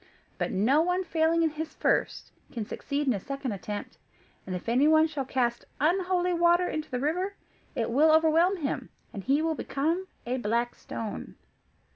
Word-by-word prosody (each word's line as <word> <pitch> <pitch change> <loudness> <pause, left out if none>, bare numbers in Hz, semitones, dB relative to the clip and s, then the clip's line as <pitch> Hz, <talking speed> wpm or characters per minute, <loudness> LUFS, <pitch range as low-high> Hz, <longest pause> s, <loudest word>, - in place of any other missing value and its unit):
But - - -1
no 245 +11 +3
one 360 +2 +1
failing 330 -1 +2
in 320 - +2
his 310 +1 -6
first, - - 0 0.2
can 225 -3 -4
succeed 285 +6 -3
in 260 - +3
a 200 - -2
second 275 +3 -4
attempt; 205 +1 -6 0.5
and 185 - -3
if 180 - -7
anyone 300 +7 +5
shall 295 -4 -3
cast 240 -2 -1
unholy 360 +3 +2
water 345 +1 +4
into 310 0 -4
the 250 - -2
river, 360 +8 -1 0.4
it 230 0 -1
will 305 +6 +5
overwhelm 325 +4 +4
him, 290 -5 -3 0.2
and 200 - -6
he 280 +6 +2
will 325 0 +1
become 325 +6 -1 0.2
a 250 +2 -1
black 235 +1 0
stone." 220 -2 -6
300 Hz, 170 wpm, -28 LUFS, 245-330 Hz, 0.5 s, anyone